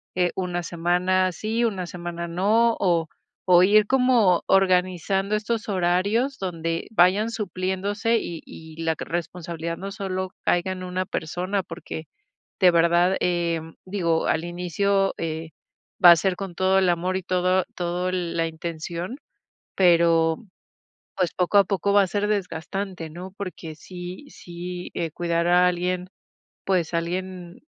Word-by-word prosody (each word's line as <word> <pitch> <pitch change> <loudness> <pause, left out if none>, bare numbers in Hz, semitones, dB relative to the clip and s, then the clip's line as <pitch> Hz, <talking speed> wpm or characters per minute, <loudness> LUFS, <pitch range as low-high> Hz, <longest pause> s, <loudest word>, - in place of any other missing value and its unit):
eh, 180 -1 +2
una 180 -2 -2
semana 180 +2 +1
sí, 220 +7 -2
una 195 -6 -1
semana 170 0 -6
no, 215 +7 +2
o 170 -4 +2 0.4
o 175 0 +8
ir 210 +2 +5
como 250 -9 +3
organizando 190 +1 +2
estos 215 0 -2
horarios 200 +9 +1
donde 165 -3 -3
vayan 200 +2 +4
supliéndose 205 +2 -1
y 165 -2 -6
y 160 0 -11
la 160 -1 0
responsabilidad 170 -1 -4
no 195 +1 -6
solo 190 -1 -4
caiga 175 +2 +1
en 185 0 -7
una 185 +1 -2
persona, 180 +6 -2
porque 165 -2 -8 0.5
de 180 -2 +6
verdad, 170 +2 +3
em, 170 -2 -1
digo 170 -4 0
al 160 - +1
inicio, 195 +3 0
eh, 160 0 -4 0.5
va 175 - +11
a - - +9
ser 185 +2 0
con 195 -3 -6
todo 190 +1 +3
el 185 -1 +3
amor 180 +2 0
y 190 - -5
todo 185 +1 +1
todo 180 +1 -2
el 180 -2 -2
la 165 0 +1
intención, 170 - -5 0.6
pero 165 -3 +4 0.8
pues, 180 -3 0
poco 185 +3 +3
a 200 - +6
poco 200 0 0
va 200 0 +6
a 195 - +1
ser 205 +2 -1
desgastante, 190 -2 -3
¿no? 180 +3 -9
Porque 180 -5 -7
sí 180 - -9
sí, 175 +1 -7
eh, 165 -2 -2
cuidar 170 0 -1
a 180 +1 +5
alguien, 180 +1 -2 0.6
pues, 180 -3 0
alguien 180 +1 -4
180 Hz, 145 wpm, -24 LUFS, 170-195 Hz, 0.8 s, va